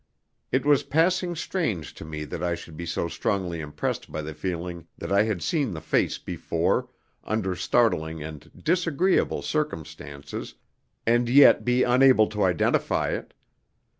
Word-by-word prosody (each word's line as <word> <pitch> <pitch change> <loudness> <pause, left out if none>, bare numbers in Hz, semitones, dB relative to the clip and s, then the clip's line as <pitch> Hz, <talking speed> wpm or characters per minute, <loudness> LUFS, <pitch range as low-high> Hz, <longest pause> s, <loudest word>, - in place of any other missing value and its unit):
It 130 +2 +1
was 145 -2 +5
passing 175 +5 +1
strange 115 - -2
to - - -10
me 75 -1 -6
that - - -6
I 85 -1 0
should 80 -2 -11
be 85 +2 -6
so 85 - -1
strongly 90 -1 -2
impressed 75 -1 -4
by 75 - -4
the 80 +1 -6
feeling 85 -1 -5
that 85 - -6
I 100 +1 +5
had 105 -6 -2
seen 140 - 0
the - - -5
face 80 - 0
before, - - -1 0.3
under 95 -4 -1
startling 80 -5 +1
and 75 0 -9
disagreeable 175 +1 +1
circumstances, 80 - -4 0.5
and 120 +1 +3
yet 140 +3 +7
be 125 +1 +3
unable 125 -2 +5
to 105 -1 -4
identify 90 -4 +1
it. - - -5
95 Hz, 150 wpm, -26 LUFS, 80-135 Hz, 0.5 s, yet